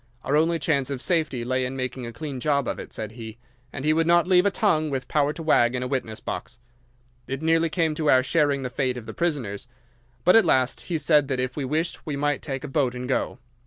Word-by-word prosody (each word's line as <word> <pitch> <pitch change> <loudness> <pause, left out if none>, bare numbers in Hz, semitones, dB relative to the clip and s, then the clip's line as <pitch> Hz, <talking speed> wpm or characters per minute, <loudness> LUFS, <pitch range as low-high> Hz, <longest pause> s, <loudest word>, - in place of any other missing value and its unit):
Our 140 - 0
only 165 +2 +3
chance 140 -3 0
of 140 -2 -3
safety 155 -6 0
lay 130 +1 0
in 130 +1 -3
making 130 -1 -4
a - - -6
clean 135 +3 -6
job 140 -1 +1
of - - -3
it, - - -8
said 110 -1 -5
he, 110 -1 -9 0.3
and 135 0 -6
he 155 - +4
would 165 +1 +1
not 170 0 +5
leave 180 +1 +4
a - - +5
tongue 160 -7 +1
with 130 -2 -3
power 145 -1 +1
to 165 - -7
wag 120 -6 +3
in 125 - -2
a - - -2
witness 125 -5 -3
box. - - -6 0.7
It 135 +3 -4
nearly 165 +1 +3
came 160 -1 0
to 155 -1 -1
our 130 0 +5
sharing 140 -1 +1
the 125 - -4
fate 130 -1 -1
of 120 - -8
the - - -7
prisoners, 130 -10 -2 0.6
but 180 - +5
at 225 - +7
last 130 -1 +1
he 170 - 0
said 150 -1 +3
that 135 -2 -2
if 130 0 -2
we 145 - -3
wished 155 +5 -2
we 150 - -4
might 145 -1 0
take 135 -3 -4
a - - -4
boat 135 -3 0
and 125 0 -5
go. 130 - -1
140 Hz, 250 wpm, -25 LUFS, 130-155 Hz, 0.7 s, at